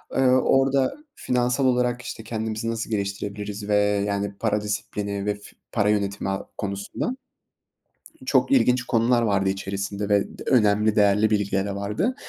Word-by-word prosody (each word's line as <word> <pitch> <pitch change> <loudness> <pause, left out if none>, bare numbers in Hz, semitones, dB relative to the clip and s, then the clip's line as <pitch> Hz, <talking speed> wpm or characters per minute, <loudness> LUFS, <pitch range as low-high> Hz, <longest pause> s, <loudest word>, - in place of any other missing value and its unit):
eee, - - +1
orada 135 - +3 0.2
finansal 125 +2 0
olarak, 125 -1 +1
işte, 115 -2 -7
kendimizi 110 0 -3
nasıl 115 0 -4
geliştirebiliriz 100 0 -4
ve, 105 - +3 0.3
yani, 100 0 -2
para 105 -2 0
disiplini 100 -1 -3
ve 105 - +1
f 100 - -17 0.3
para 105 -2 +1
yönetimi, 100 -2 0
a 95 0 -3
konusunda 100 - -3 1.1
çok - - +2
ilginç 125 - +4
konular 120 0 +2
vardı 100 -3 +1
içerisinde 100 +1 -3
ve 100 -1 +1
d - - -7
önemli, 105 -3 +3
değerli 105 +1 +4
bilgilere 100 -1 0
vardı. 105 - -1
105 Hz, 140 wpm, -24 LUFS, 100-120 Hz, 1.1 s, ilginç